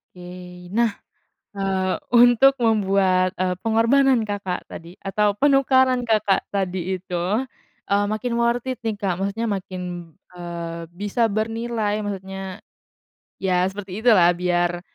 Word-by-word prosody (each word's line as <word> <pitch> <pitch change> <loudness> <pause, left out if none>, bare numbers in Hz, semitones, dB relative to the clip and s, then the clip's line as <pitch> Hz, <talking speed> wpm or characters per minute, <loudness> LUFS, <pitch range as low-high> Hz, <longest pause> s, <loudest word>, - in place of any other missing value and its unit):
Oke. 180 0 -11
Nah, 235 -1 +3 0.6
eee, 190 -2 -1 0.2
untuk 245 +3 +6
membuat, 190 -4 +2
eee, 185 0 -1
pengorbanan 230 +3 +3
Kakak 200 -3 -4
tadi, 170 +2 -10
atau 205 +1 +1
penukaran 260 -1 +3
Kakak 210 -3 +1
tadi 190 -2 -2
itu, 185 +5 -2 0.5
eee, 200 0 +3
makin 215 +3 -2
worth 235 0 +1
it, 255 - -6
nih, 225 -3 -3
Kak, 195 -4 -2
maksudnya 205 +3 -2
makin, 180 -4 -6 0.2
eee, 170 -1 -6
bisa 205 +5 0
bernilai, 220 0 -2
maksudnya, 195 -1 -6 0.7
ya, 185 -1 +1
seperti 195 0 -7
itulah, 200 -7 +5
biar 175 0 0
195 Hz, 120 wpm, -22 LUFS, 180-225 Hz, 0.7 s, untuk